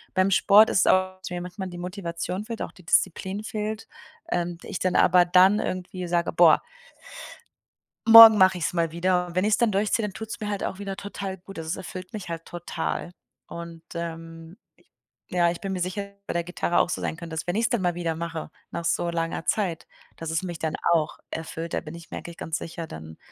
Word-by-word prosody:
beim 185 +1 +3
Sport 210 +3 +6
ist 200 - +3
auch, 185 0 +2
dass 185 - -7
mir 175 - -4
manchmal 180 +2 -6
die 175 - -9
Motivation 180 +1 -4
fehlt, 230 0 -5
auch - - -7
die 180 - -18
Disziplin 190 +4 +1
fehlt. 215 0 -4 0.4
Ähm, 175 0 -1
ich - - -5
dann 185 -1 0
aber 180 0 +6
dann 185 +4 +5
irgendwie 185 0 -4
sage: 170 0 0
„Boah“ 170 -1 +6 1.4
„morgen 225 -1 +11
mache 185 -1 +5
ich's 170 - -1
mal 165 -2 0
wieder,“ 180 +1 +1
und 175 0 -11
wenn 185 - +2
ich's 215 0 +3
dann 235 -3 +2
durchziehe, 205 +3 +1
dann 200 - -5
tut 220 +1 -7
es - - -6
mir 215 - -4
halt 205 -1 -3
auch - - -3
wieder 195 -1 -5
total 195 -1 -6
gut, 195 +2 -13
also, 160 -1 -6
das - - -1
erfüllt 185 +2 -8
mich 200 -5 -6
halt 165 0 -5
total. 175 0 -4 0.4
Und, 170 -1 -8
ähm, 165 +1 -7 0.2
ich - - -29 0.4
ja, 175 -1 +3
ich 170 - -4
bin 195 -1 -4
mir 185 - -3
sicher, 185 +3 -2
dass 200 0 -14
es 200 - -46
bei - - -2
der 170 0 0
Gitarre 175 0 -1
auch - - +3
so - - -3
sein 160 - -3
könnte, 165 -1 -8
dass 160 - -4
wenn 175 - -1
ich 225 - +1
es 230 - +2
dann 240 -6 0
mal 175 -2 0
wieder 170 -2 -2
mache, 165 -1 -5 0.2
nach 170 - -5
so 170 - 0
langer 165 -1 -3
Zeit, 185 -7 -1 0.3
dass 165 -1 -5
es 165 +3 -1
mich 175 -3 -5
dann 160 -1 -2 0.2
auch 155 -2 0
erfüllt, 165 +1 -5
da - - 0
bin 155 +2 -9
ich 170 -1 -13
mir - - -5
eigentlich 170 0 -10
ganz 160 0 -3
sicher, 165 0 -6
dann 80 - -10
180 Hz, 230 wpm, -25 LUFS, 170-195 Hz, 1.4 s, morgen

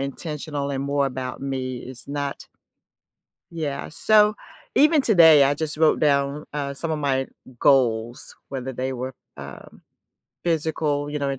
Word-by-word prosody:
intentional 145 0 -4
and 135 0 -2
more 140 0 0
about 130 0 -5
me, 130 -2 -3
it's 130 +1 -11
not 140 -1 -4 1.0
Yeah, 150 -5 -4
so, 210 +5 +4 0.4
even 300 -1 +5
today, 160 - +7
I 140 +1 +2
just 155 +1 -3
wrote 155 0 +3
down, 140 0 +1
uh, 140 -1 -3
some 165 +3 -4
of 155 - -1
my 135 -2 0 0.3
goals, 120 -4 +1
whether 130 -1 -5
they 130 +1 -3
were, 130 +1 -5 0.2
um, 70 -1 -11 0.6
physical, 155 -3 -1
you 150 - -3
know, 140 -1 -1
in 135 - -4
140 Hz, 150 wpm, -23 LUFS, 130-155 Hz, 1.0 s, today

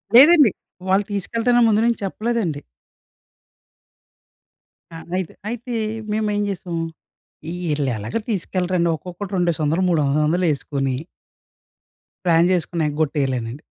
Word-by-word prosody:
లేదండి. 290 - +8 0.4
వాళ్ళు 195 +2 +4
తీసుకెల్తానని 230 +4 +2
ముందు 215 0 +3
నుంచి 235 -1 +1
చెప్పలేదండి. 210 -7 -2 2.3
ఆ! - - -10 0.2
అయితే 185 -3 -4 0.2
అయితే 240 +1 -5 0.4
మేమేం 210 -1 0
జేసాం. 175 -3 -4 0.9
ఈళ్ళు 145 -2 0
ఎలాగో 110 - -3
తీసుకెళ్ళరండి 180 -3 0
ఒక్కొక్కడు 180 +5 -8
రెండేసోందలు 170 -1 +1
మూడు 165 -3 +2
వంద 140 +2 +1
వందలేసుకొని 150 -5 0 1.3
ప్లాన్ 170 0 +4
చేసుకున్నా 175 -2 0
ఎగొట్టేయలేనండి. 140 -4 -1
180 Hz, 95 wpm, -21 LUFS, 150-210 Hz, 2.3 s, లేదండి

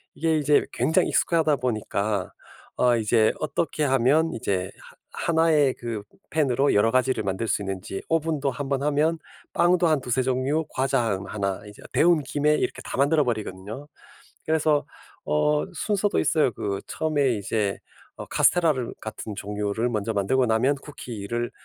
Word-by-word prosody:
이게 160 -1 +1
이제 150 0 +3
굉장히 170 +3 +2
익숙하다 160 -3 +2
보니까 105 -5 -2 0.5
어 120 -1 +3
이제 110 0 +3
어떻게 155 0 -1
하면 140 +5 +3
이제 95 -4 -2
하 - - -16 0.2
1 165 0 +2
의 145 -4 +4
그 115 -3 -4 0.3
팬으로 140 -3 +2
여러 105 +2 +4
가지를 130 -3 +1
만들 100 +4 -2
수 - - 0
있는지 95 0 -5
오븐도 155 -3 0
1 135 +2 -5
번 140 -1 0
하면 155 +3 +1 0.3
빵도 175 0 +3
한 155 -3 +2
2-3 125 +1 0
종류 130 +5 0
과자 130 -1 0
한 100 -4 -2
1 100 -2 -3
이제 105 - -13
데운 165 -3 +4
김에 150 +3 +1
이렇게 - - -2
다 - - -6
만들어 145 +2 +3
버리거든요. 110 +3 -4 0.6
그래서 155 -2 +2 0.4
어 75 0 +1
순서도 205 -1 0
있어요. 155 -7 +2
그 100 -2 -3
처음에 145 -4 0
이제 105 -1 -1 0.4
어 - - -7
카스텔라를 155 -9 +2
같은 110 -1 -6
종류를 105 +3 -2
먼저 110 0 -1
만들고 125 +6 +2
나면 120 +6 +2
쿠키를 120 -5 -5
130 Hz, 305 characters per minute, -25 LUFS, 105-150 Hz, 0.6 s, 의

